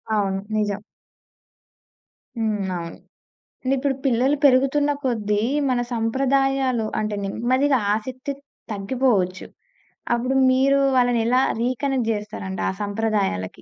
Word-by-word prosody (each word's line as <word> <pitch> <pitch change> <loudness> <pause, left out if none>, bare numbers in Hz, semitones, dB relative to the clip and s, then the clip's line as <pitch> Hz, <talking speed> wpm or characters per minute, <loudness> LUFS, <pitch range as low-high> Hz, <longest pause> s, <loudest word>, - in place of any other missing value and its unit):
అవును. 195 -2 0 0.2
నిజం. 205 -1 -1 1.6
హ్మ్. 220 -1 0 0.2
అవును. 170 -1 -7 0.7
అంటే 265 +1 +1
ఇప్పుడు 270 0 0
పిల్లలు 260 +3 +3
పెరుగుతున్న 275 +2 +4
కొద్దీ 210 -5 0 0.3
మన 250 -1 +1
సంప్రదాయాలు 265 +1 +1
అంటే 215 -1 -2
నెమ్మదిగా 255 +7 +1 0.2
ఆసక్తి 255 +5 -5 0.4
తగ్గిపోవచ్చు. 200 -3 0 0.7
అప్పుడు 255 +3 -1 0.2
మీరు 275 +2 +3 0.2
వాళ్ళని 245 -2 +3
ఎలా 250 +2 +3 0.2
రీ 245 - +2
కనెక్ట్ 260 -5 0
జేస్తారు 210 -2 -5
అంటే 190 - -3
ఆ - - 0
సంప్రదాయాలకి? 205 - -1
240 Hz, 110 wpm, -23 LUFS, 210-265 Hz, 1.6 s, పెరుగుతున్న